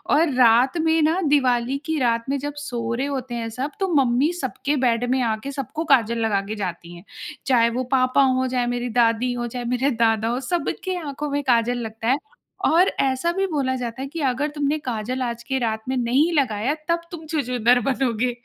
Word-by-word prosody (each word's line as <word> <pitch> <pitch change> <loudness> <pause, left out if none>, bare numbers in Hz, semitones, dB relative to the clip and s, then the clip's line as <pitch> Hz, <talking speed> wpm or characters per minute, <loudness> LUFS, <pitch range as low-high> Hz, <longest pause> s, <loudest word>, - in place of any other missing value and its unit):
और 310 -2 +3
रात 250 +5 +4
में 320 0 +2
ना 320 +4 +2
दिवाली 260 -2 +2
की 320 -1 -1
रात 230 -2 +1
में 280 - +1
जब 290 +1 -4
सो 235 -5 -3
रहे 260 +4 -1
होते 260 -3 -4
हैं 230 -1 -3
सब 260 +6 -4
तो 385 - +1
मम्मी 265 +3 +3
सबके 290 -2 -2
बेड 240 -2 +1
में 260 0 +2
आके 225 +4 -2
सबको 280 +4 -4
काजल 235 -5 +3
लगा 200 -3 +1
के 215 +2 -5
जाती 175 -3 -5
हैं। 170 - -13 0.4
चाहे 235 -3 +4
वो 250 +2 -2
पापा 255 +1 +3
हो, 260 0 +2
चाहे 250 -1 0
मेरी 245 0 -2
दादी 235 +1 +3
हो, 240 0 -3
चाहे 245 +1 -5
मेरे 250 +3 +1
दादा 225 -1 +1
हो 240 +2 -1
सबके 350 +5 -2
आँखों 295 -2 -5
में 285 +1 -1
काजल 245 -1 +2
लगता 225 0 -5
है। 265 +3 +4 0.5
और 350 +4 +4
ऐसा 270 +5 +1
भी 390 - +2
बोला 275 -6 -1
जाता 245 0 -5
है 275 - -4
कि 330 +4 -7
अगर 275 +4 -1
तुमने 290 +1 0
काजल 250 0 -3
आज 235 -1 -3
के 265 -1 -2
रात 220 -2 -1
में 260 - 0
नहीं 260 +8 +2
लगाया 255 -2 +1 0.2
तब 335 0 +2
तुम 325 -2 -8
छछूंदर 250 -5 +2
बनोगे। 250 -2 0
255 Hz, 210 wpm, -22 LUFS, 235-285 Hz, 0.5 s, रात